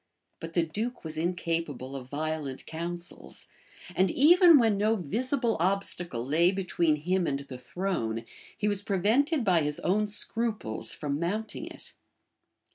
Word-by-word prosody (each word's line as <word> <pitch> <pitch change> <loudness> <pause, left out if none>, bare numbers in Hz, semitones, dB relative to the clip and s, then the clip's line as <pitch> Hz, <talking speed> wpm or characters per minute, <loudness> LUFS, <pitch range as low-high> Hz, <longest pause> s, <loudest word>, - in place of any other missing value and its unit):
But 165 0 -8
the 170 - +4
duke 215 +10 -3
was 160 -1 -3
incapable 165 -5 -2
of 130 -2 -7
violent 150 -2 -3
counsels; 170 +2 -6 0.5
and 190 0 +3
even 340 - +7
when 225 -5 +3
no 215 +3 +2
visible 235 - 0
obstacle 175 -8 -1
lay 165 +6 +3
between 180 -5 +1
him 175 +4 0
and 140 0 -1
the 135 -2 -9
throne, 125 -10 -3 0.3
he 210 - 0
was 205 -1 0
prevented 230 - +1
by 180 -4 +4
his 150 0 0
own 210 +3 +1
scruples 210 - -2
from 145 -1 -3
mounting 210 +6 -3
it. - - -10
175 Hz, 140 wpm, -28 LUFS, 155-210 Hz, 0.5 s, even